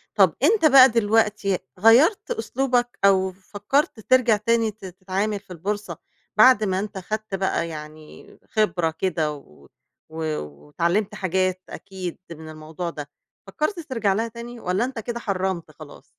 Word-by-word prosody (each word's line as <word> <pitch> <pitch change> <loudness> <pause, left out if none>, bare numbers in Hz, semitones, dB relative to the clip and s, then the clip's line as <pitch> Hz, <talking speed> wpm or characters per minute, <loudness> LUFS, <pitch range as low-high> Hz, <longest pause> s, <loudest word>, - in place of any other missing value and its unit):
طَب 190 -5 +4
أنت 385 +1 +4
بقى 265 -3 +8
دلوقتي، 210 -3 +1 0.2
غيّرت 285 - +4
أسلوبك، 245 +2 -1
أو 190 -1 +3
فكّرت 205 +8 -2
ترجَع 240 -1 +3
تاني 225 +1 +1
ت 205 -1 -14
تتعامل 190 +3 -3
في 195 -2 -12
البورصة، 205 +5 -4 0.4
بَعد 255 -4 +6
ما 190 -2 0
أنت 210 0 -5
خَدت 215 +2 -4
بقى 190 -3 -1
يعني 155 0 -11
خبرة 180 -6 +1
كده 160 -5 0
و 75 - -16 0.4
و 160 - -11 0.5
واتعلّمت 195 - -1
حاجات 185 -1 -1
أكيد 190 -3 -7
من 160 -1 -9
الموضوع 155 +2 -6
ده، 150 -3 -8 0.4
فكّرت 305 - -2
ترجَع 230 -10 -1
لها 225 +4 -1
تاني 235 +1 -9
والّا 190 +5 0
أنت 260 -2 -6
كده 235 +2 -5
حرّمت 190 -6 -3
خلاص؟ 155 -1 -13
200 Hz, 145 wpm, -23 LUFS, 180-230 Hz, 0.5 s, بقى